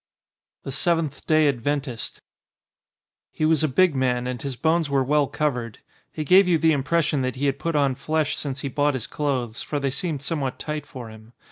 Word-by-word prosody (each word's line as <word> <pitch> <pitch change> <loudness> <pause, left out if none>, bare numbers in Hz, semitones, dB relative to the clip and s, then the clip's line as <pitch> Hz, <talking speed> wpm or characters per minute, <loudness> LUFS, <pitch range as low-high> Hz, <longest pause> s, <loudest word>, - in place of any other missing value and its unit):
XXXVII - - -66
THE 135 - -5
SEVENTH 165 0 0
DAY 155 -1 +4
ADVENTIST 135 -2 -2 1.1
HE 155 - 0
was 160 0 +3
a - - +4
big 170 +5 +3
man, 125 -2 +1
and 125 -2 -4
his 135 -2 -4
bones 160 +3 +1
were 135 -1 +2
well 145 +1 +2
covered. 125 -8 -2 0.3
He 155 - -4
gave 185 +5 +6
you 175 -2 +4
the 160 0 +3
im 140 - 0
pression 150 -1 +1
that 130 -1 -2
he 135 +2 -2
had 140 0 0
put 165 -1 -2
on 140 -2 +3
flesh 150 +3 -1
since 140 -2 -4
he - - -3
bought 145 +1 +1
his 125 - -3
clothes, 130 -6 -2
for 145 - -3
they 140 -1 -1
seemed 145 0 -3
somewhat 140 -5 -2
tight 150 -1 -5
for 125 -7 -8
him. 110 +1 -14
145 Hz, 210 wpm, -24 LUFS, 130-155 Hz, 1.1 s, gave